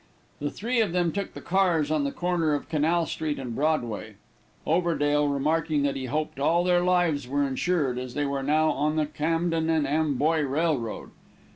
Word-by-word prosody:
The 145 Hz, -, -2 dB
three 235 Hz, -, -1 dB
then 180 Hz, -4 st, +1 dB
took 200 Hz, +2 st, -4 dB
the -, -, -7 dB
cars 175 Hz, -5 st, +1 dB
on 150 Hz, -2 st, +1 dB
the 140 Hz, -, -1 dB
corner 170 Hz, -3 st, 0 dB
of 145 Hz, -, -5 dB
Canal 165 Hz, +2 st, +1 dB
street 155 Hz, -2 st, -3 dB
and 125 Hz, -3 st, -5 dB
Broadway, 135 Hz, -7 st, -1 dB, 0.5 s
Overdale 150 Hz, -3 st, +2 dB
remarking 150 Hz, +1 st, 0 dB
that 140 Hz, -1 st, 0 dB
he 135 Hz, -1 st, -4 dB
hoped 150 Hz, +2 st, -3 dB
all 170 Hz, +5 st, +2 dB
their 180 Hz, -1 st, +3 dB
lives 175 Hz, -7 st, +1 dB
were 140 Hz, +2 st, 0 dB
insured, 135 Hz, -2 st, 0 dB
as 125 Hz, -1 st, -7 dB
they 145 Hz, -, 0 dB
were 140 Hz, -1 st, -2 dB
now 155 Hz, +3 st, +2 dB
on 150 Hz, +3 st, 0 dB
the 155 Hz, -1 st, +1 dB
Camden 165 Hz, +2 st, -1 dB
and 160 Hz, -3 st, +2 dB
Amboy 155 Hz, +1 st, +1 dB
Railroad. 140 Hz, -4 st, -1 dB
155 Hz, 175 wpm, -26 LUFS, 140-165 Hz, 0.5 s, their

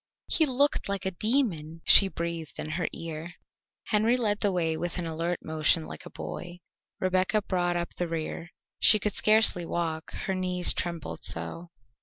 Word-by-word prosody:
"He 320 Hz, -3 st, +2 dB
looked 280 Hz, -3 st, +1 dB
like 200 Hz, -1 st, -3 dB
a 190 Hz, -, 0 dB
demon!" 175 Hz, -, -1 dB
she 195 Hz, -, +9 dB
breathed 170 Hz, -3 st, -5 dB
in 155 Hz, -, -5 dB
her 175 Hz, +2 st, -1 dB
ear. 165 Hz, +1 st, -7 dB, 0.5 s
Henry 220 Hz, +4 st, +2 dB
led 210 Hz, -4 st, 0 dB
the 205 Hz, -, +1 dB
way 165 Hz, -3 st, 0 dB
with 175 Hz, +2 st, -4 dB
an 175 Hz, -, -3 dB
alert 165 Hz, +2 st, -2 dB
motion 155 Hz, +1 st, +2 dB
like -, -, -9 dB
a -, -, -10 dB
boy; 175 Hz, 0 st, -8 dB, 0.4 s
Rebecca 185 Hz, +3 st, +1 dB
brought 175 Hz, -2 st, -1 dB
up 175 Hz, 0 st, -4 dB
the 175 Hz, -, -3 dB
rear; 165 Hz, 0 st, -5 dB, 0.3 s
she 215 Hz, -, +7 dB
could 210 Hz, 0 st, -2 dB
scarcely 215 Hz, -4 st, +4 dB
walk, 165 Hz, -2 st, -3 dB
her 190 Hz, -, -1 dB
knees 180 Hz, -1 st, +2 dB
trembled 165 Hz, -, -4 dB
so. 85 Hz, -, -3 dB
175 Hz, 170 wpm, -27 LUFS, 165-200 Hz, 0.5 s, she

